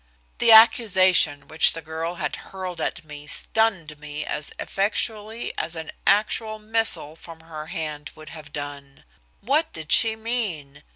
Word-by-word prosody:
The 235 - +5
accusation 190 -9 +5
which 155 - +4
the 165 - -7
girl 160 +2 -5
had 150 -4 -3
hurled 185 -2 -7
at 170 - -3
me 150 -1 -10
stunned 170 -5 0
me 150 0 -6
as 150 - -4
effectually 215 +2 -2
as 170 - -1
an 160 -1 -6 0.2
actual 215 +2 +1
missile 215 -8 +1
from 165 0 -12
her 155 -1 -9
hand 155 -4 -5
would 155 -1 -12
have 150 -2 -11
done. 145 -1 -8 0.4
What 300 +8 +1
did 160 -2 -7
she 225 -1 +4
mean? 220 - -3
165 Hz, 150 wpm, -23 LUFS, 150-215 Hz, 0.4 s, The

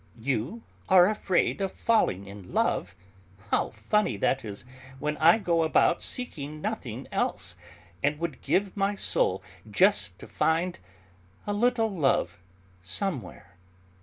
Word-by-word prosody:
"You 135 - -2 0.3
are 185 -2 +8
afraid 200 -2 +1
of 195 - -1
falling 215 - +1
in 100 -2 -11
love? - - 0 0.6
How - - +2
funny 110 - 0
that 130 +6 +1
is, 105 +1 -7 0.3
when 150 +2 -2
I 165 +6 +6
go 175 -6 +1
about 160 +1 +3
seeking 155 - -4
nothing - - -4
else, 85 - -1 0.5
and 145 +1 +1
would 170 0 -4
give 195 0 0
my 200 0 +1
soul 470 - +1 0.3
just - - +3
to - - -11
find 170 +3 0 0.7
a 205 - -1
little 225 0 +2
love 135 - +1 0.4
somewhere!" 100 - -4
165 Hz, 130 wpm, -27 LUFS, -, 0.7 s, are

